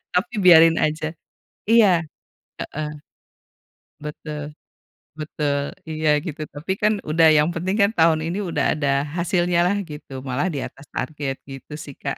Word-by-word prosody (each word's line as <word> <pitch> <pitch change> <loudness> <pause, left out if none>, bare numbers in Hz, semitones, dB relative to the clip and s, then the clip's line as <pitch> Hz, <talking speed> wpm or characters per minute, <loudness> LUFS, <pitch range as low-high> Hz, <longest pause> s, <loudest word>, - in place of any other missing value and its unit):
tapi 200 +7 +1
biarin 165 -2 +8
aja, 155 0 0 0.6
iya, 205 -7 +5 0.6
heeh, 155 0 -4 1.2
betul, 150 0 -6 0.8
betul 150 -2 -1 0.3
iya 155 0 -1 0.2
gitu 155 -4 -6
tapi 155 +6 -3
kan 210 +1 +4 0.2
udah 165 +1 +5
yang 150 +2 +4
penting 185 +4 -1
kan 200 +1 +5
tahun 160 -1 +4
ini 175 +4 -2
udah - - 0
ada 145 -2 -1 0.3
hasilnyalah 175 +2 +1
gitu 150 -2 -10 0.2
malah 130 +7 0
diatas 140 +1 -6
target 145 0 -3
gitu 135 +2 -10
sih 140 - -10
Kak, 140 - -3
160 Hz, 135 wpm, -22 LUFS, 150-175 Hz, 1.2 s, biarin